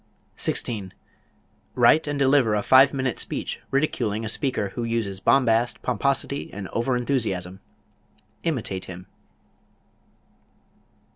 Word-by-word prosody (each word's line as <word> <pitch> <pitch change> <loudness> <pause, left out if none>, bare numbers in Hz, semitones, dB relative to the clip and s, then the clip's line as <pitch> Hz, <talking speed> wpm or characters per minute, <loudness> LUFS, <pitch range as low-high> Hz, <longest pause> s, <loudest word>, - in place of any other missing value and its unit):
16. 100 -5 -2 0.8
Write 130 +6 +4
and 145 0 -2
deliver 135 -5 +3
a 105 - -1
five 135 +1 +6
minute 130 -5 -2
speech - - -4
ridiculing 115 -6 -1
a - - -2
speaker 125 -4 0
who 120 - -5
uses 115 -5 -2
bombast, 115 -1 +2
pomposity 140 +3 -1
and 100 -1 -6
over 125 +2 0
enthusiasm. 95 -8 -2 0.8
Imitate 115 - -2
him. 90 0 -9
120 Hz, 110 wpm, -24 LUFS, 100-135 Hz, 0.8 s, five